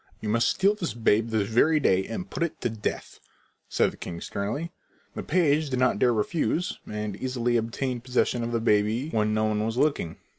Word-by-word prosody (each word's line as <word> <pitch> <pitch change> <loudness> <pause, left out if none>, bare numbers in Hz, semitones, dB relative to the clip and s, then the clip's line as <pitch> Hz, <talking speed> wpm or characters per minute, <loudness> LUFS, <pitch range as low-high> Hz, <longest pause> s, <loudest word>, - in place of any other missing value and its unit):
"You 105 - -4
must 115 +2 +2
steal 195 +2 +3
this 180 - -4
babe 115 -1 +2
this 110 -3 0
very 150 +8 +3
day 95 -9 +3
and 145 +11 -5
put - - -6
it 170 -2 -1
to 120 - -1
death," 110 -2 -5 0.5
said - - +2
the - - -15
king 85 -1 -6
sternly. 115 - -4 0.4
The - - -5
page 155 -3 +2
did 130 - -1
not 130 0 +2
dare 125 - +4
refuse, 160 - -1
and 105 -1 -3
easily 120 -1 -1
obtained 120 +2 -2
possession 125 -1 0
of 115 - -3
the 115 - 0
baby 110 +6 +1
when 105 -1 +1
no 110 - +1
one 105 0 0
was 115 +2 -2
looking. 140 - 0
115 Hz, 200 wpm, -26 LUFS, 110-140 Hz, 0.5 s, dare